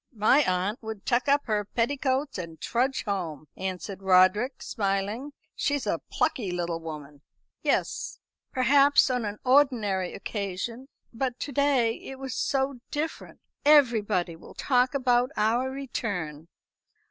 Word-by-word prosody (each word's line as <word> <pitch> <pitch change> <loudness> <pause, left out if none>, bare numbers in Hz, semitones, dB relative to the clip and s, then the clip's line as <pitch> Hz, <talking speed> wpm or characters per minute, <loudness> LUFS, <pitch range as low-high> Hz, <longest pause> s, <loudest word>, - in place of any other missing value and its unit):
"My 220 +6 +5
aunt 190 0 0
would 220 -3 -7
tuck 240 +2 +1
up 285 +1 +3
her 210 -3 0
petticoats 260 +3 -1
and 165 -2 -7
trudge 255 +3 0
home," 170 - -4
answered 190 +1 -5
Roderick, 190 +7 +3
smiling. 205 +6 -2 0.2
"She's 285 -2 0
a - - -1
plucky 255 - 0
little 175 -2 -2
woman." 150 -3 -8 0.4
"Yes, - - -1 0.3
perhaps 275 +2 +4
on 250 -3 -1
an 205 0 -4
ordinary 235 -9 +2
occasion. 205 +5 -4 0.3
But 250 +1 -2
to 290 - -3
day 265 -5 +2
it 270 - -8
was 265 -2 -5
so 270 -1 0
different. 310 +2 -4 0.2
Everybody 225 - +4
will 165 - -14
talk 255 0 +2
about 250 -2 +3
our 235 +5 +2
return." 190 - -4
230 Hz, 130 wpm, -27 LUFS, 190-265 Hz, 0.4 s, My